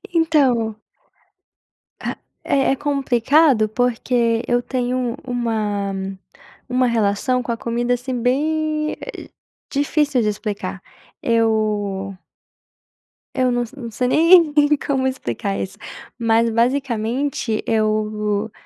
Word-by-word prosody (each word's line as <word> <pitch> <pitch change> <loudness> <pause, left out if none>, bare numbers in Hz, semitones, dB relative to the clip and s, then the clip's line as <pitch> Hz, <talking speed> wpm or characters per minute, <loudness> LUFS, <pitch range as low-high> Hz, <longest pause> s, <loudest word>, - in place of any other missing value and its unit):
Então 265 -10 +2 1.2
Ah, - - -4 0.3
é 270 -1 +2
é - - +2
complicado, 275 -3 +2
porque 235 0 +1
eu 245 0 +2
tenho 250 -1 -2
uma 215 -5 -1 0.8
uma 250 0 +2
relação 235 +3 +1
com 240 - -3
a 230 - -2
comida, 240 +2 -1
assim, 250 0 -3
bem, 305 +4 0
eh, - - -8 0.4
difícil 285 -2 +1
de 215 - +1
explicar. 205 -3 -4 0.4
Eu 210 -4 0 1.2
Eu 255 -1 +2
não 245 0 0
se 235 - -15
não 235 -2 -6
sei 250 +3 -1
nem 330 +2 +6 0.3
como 265 -2 +1
explicar 120 - -3
isso, 100 -1 -5 0.4
mas 230 0 +3
basicamente 240 0 0
eu 215 -1 0
240 Hz, 105 wpm, -20 LUFS, 215-265 Hz, 1.2 s, nem